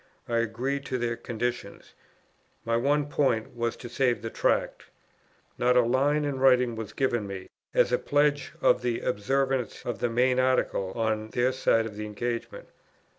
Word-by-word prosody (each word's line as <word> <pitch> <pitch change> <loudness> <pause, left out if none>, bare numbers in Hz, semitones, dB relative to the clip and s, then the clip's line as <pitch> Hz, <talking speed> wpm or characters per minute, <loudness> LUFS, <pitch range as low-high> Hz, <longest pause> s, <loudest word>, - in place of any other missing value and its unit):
I 115 - 0
agreed 125 +5 -2
to 130 - -1
their 120 -1 -1
conditions. 120 -3 -5 0.7
My 115 0 +1
one 145 +5 +2
point 130 -7 0
was 120 -1 -1
to 120 - -9
save 120 0 0
the 115 - -4
Tract. - - 0 0.7
Not 125 +1 +3
a 125 - +6
line 140 +5 +2
in 140 -2 -2
writing 125 -2 +4
was 110 -2 -6
given 120 -6 0
me, 95 -1 -7 0.3
as - - +4
a 125 - +2
pledge 145 -1 +1
of - - +4
the 120 -1 -1
observance 130 +2 -1
of 120 - -3
the 120 - 0
main 125 +2 +2
article 130 -7 +1
on 110 -1 -1
their 125 +3 +1
side 115 -3 +2
of 105 -2 -7
the 105 0 -4
engagement. 115 +3 -5
120 Hz, 170 wpm, -27 LUFS, 115-130 Hz, 0.7 s, a